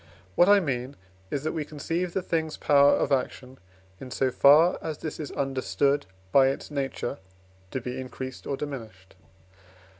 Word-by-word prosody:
What 175 - +5
I 205 0 +7
mean 135 -5 -3 0.3
is, 140 - -3
that 155 - -1
we 160 - -3
conceive 165 +4 -3
the 190 - -1
thing's 160 -2 -2
power 140 -1 +5
of - - -1
action, 130 -1 -2 0.4
in 130 - -8
so 130 +1 0
far 150 +7 +5
as 155 -2 -4
this 155 0 -6
is 150 - -5
understood 135 0 0 0.2
by 135 -1 +6
its 135 +2 -3
nature, 135 -4 -3 0.5
to 130 - -3
be 125 +1 -5
increased 130 0 -7
or 140 - -2
diminished. 110 -11 -8
140 Hz, 160 wpm, -27 LUFS, 130-155 Hz, 0.5 s, I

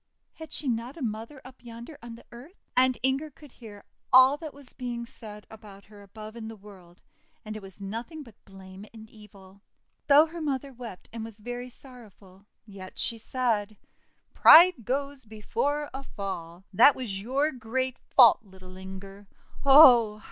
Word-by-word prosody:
Had 320 -2 -12
she 295 - 0
not 240 +4 -3
a - - -10
mother 225 +5 -6
up 255 -1 -15
yonder 235 +5 -11
on 235 0 -10
the 230 - -17
earth? 260 +11 -15
And 255 0 +3
Inger 270 +4 -1
could 295 -1 -17
hear 210 -5 -13 0.3
all 260 +2 +7
that 310 -1 -8
was 280 -2 -16
being 240 -2 -6
said 215 -4 -12
about 205 -2 -15
her 205 -1 -16
above 215 +2 -12
in 225 -2 -8
the 225 - -9
world, 190 -4 -17 0.4
and 215 0 -7
it 215 - -8
was 195 0 -14
nothing 230 +10 -7
but 230 -5 -16
blame 190 0 -13
and 220 0 -12
evil. 200 -2 -17 0.5
Though 290 +2 +7
her 330 +1 -9
mother 275 -2 -3
wept, 235 -6 -11
and 230 -1 -6
was 225 -1 -10
very 245 +3 -7
sorrowful, 210 -7 -16 0.2
yet 195 -3 -12
she 230 - -1
said: 220 -4 -2 0.2
— - - -43
'' - - -47
Pride 335 - +8
goes 275 +1 -3
before 280 +7 -3
a 270 - -6
fall! 185 -7 -8
That 245 +9 +6
was 205 -7 -5
your 275 +7 0
great 255 +1 -4
fault, 235 -4 +5
little 185 -2 -15
Inger! 195 +1 -11 0.4
Oh! 250 -7 +7
230 Hz, 175 wpm, -27 LUFS, 205-265 Hz, 0.5 s, Pride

